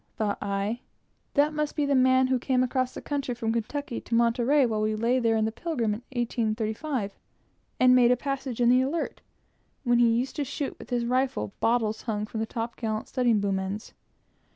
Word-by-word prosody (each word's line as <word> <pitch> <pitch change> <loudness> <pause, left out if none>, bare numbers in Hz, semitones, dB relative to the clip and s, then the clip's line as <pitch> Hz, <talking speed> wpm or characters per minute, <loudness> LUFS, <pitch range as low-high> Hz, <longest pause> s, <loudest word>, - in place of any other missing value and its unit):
thought 210 -2 -1
I, 200 +3 -2 0.6
that 295 +2 +3
must 300 -1 -2
be 295 - +1
the 280 - +1
man 260 0 +5
who 255 0 +1
came 255 0 +1
across 255 0 -1
the - - -7
country 280 -4 -2
from 225 -1 -1
Kentucky 235 +3 -3
to 230 - -2
Monterey 240 +4 +3
while 220 -3 -1
we 215 0 +1
lay 235 +4 +2
there 230 -2 +2
in 220 - +2
the 220 - -1
Pilgrim 235 -5 -1
in 215 - -6 0.2
1835, 220 0 -2 0.6
and 255 0 +6
made 245 -1 +6
a 250 - +4
passage 270 -2 -4
in 240 -1 +4
the 250 +1 +5
Alert, 285 +6 -2 0.6
when 240 -2 +3
he 240 -1 +5
used 245 +3 0
to 295 - 0
shoot 280 +1 -4
with - - -11
his 240 -2 0
rifle 250 - 0
bottles 225 -2 +1
hung 210 -3 -2
from 220 +1 -6
the 220 - -1
top 230 +1 -4
gallant 220 -2 -3
studding 245 -3 +2
sail 200 -1 0
boom 190 - 0
ends. 195 +3 -5
240 Hz, 205 wpm, -27 LUFS, 220-260 Hz, 0.6 s, and